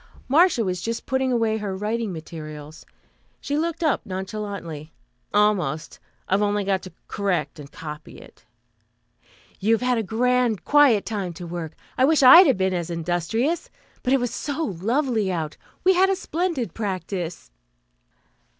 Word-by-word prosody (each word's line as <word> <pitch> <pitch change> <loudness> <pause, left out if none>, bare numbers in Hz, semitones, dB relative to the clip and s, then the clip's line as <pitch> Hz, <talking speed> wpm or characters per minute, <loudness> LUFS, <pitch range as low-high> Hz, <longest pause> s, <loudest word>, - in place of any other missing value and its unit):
Marcia 310 -3 +4
was 180 -2 -2
just 230 +4 -3
putting 265 0 0
away 225 -2 +1
her 205 -3 -4
writing 215 +1 -2
materials. 155 -2 -9 0.5
She 285 - -3
looked 330 +2 -1
up 310 -4 +1
nonchalantly. 190 -5 -6 0.4
"Almost. 195 -8 +1 0.3
I've 195 +2 +2
only 205 -1 +1
to 190 -1 -1 0.2
correct 175 -7 -2
and 145 -1 -10
copy 150 -1 -9
it." - - -16 1.2
"You've 225 +4 +2
had 250 -2 +2
a - - +1
grand 235 -1 +1
quiet 285 -8 +5
time 200 -5 -3
to 175 +1 -8
work. 165 -2 -5 0.3
I 260 - +6
wish 305 -1 +3
I 260 +5 +11
had 275 - +4
been 190 0 +1
as 175 -2 -2
industrious; 175 - -1 0.3
but 250 - -1
it 270 - +4
was 245 -2 -2
so 295 +4 -3 0.2
lovely 230 -3 +1
out. 160 -4 -3 0.3
We 375 - +5
had 380 +1 +4
a 390 - +2
splendid 340 - -2
practice." 185 - -4
210 Hz, 150 wpm, -24 LUFS, 175-255 Hz, 1.2 s, I